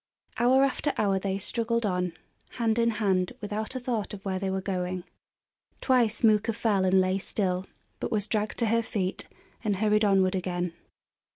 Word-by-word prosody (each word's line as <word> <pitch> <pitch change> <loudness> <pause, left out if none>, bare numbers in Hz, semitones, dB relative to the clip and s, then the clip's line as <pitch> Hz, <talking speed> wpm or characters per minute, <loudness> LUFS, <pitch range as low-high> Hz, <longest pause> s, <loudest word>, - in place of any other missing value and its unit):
Hour 255 +3 +5
after 275 +2 0
hour 195 -2 +2
they 195 0 -1
struggled 230 +3 -1
on, 180 -3 0 0.4
hand 230 -1 +1
in 235 0 +4
hand, 195 -5 +1
without 215 +4 -4
a - - -1
thought 235 -5 -2
of 195 - -14
where 190 -1 -1
they 195 0 -2
were 190 0 -1
going. 185 -2 -3 0.8
Twice 245 -4 +2
Mooka 220 0 +4
fell 205 -4 +1
and 190 +1 +4
lay 185 +1 +2
still, 185 -2 -1 0.3
but - - -3
was 210 -2 +1
dragged 215 -1 -1
to 235 - +1
her 230 +1 +2
feet 195 -4 -2 0.4
and 210 -3 +1
hurried 210 +2 +2
onward 195 -2 +4
again. 180 -2 -2
205 Hz, 175 wpm, -28 LUFS, 190-225 Hz, 0.8 s, Hour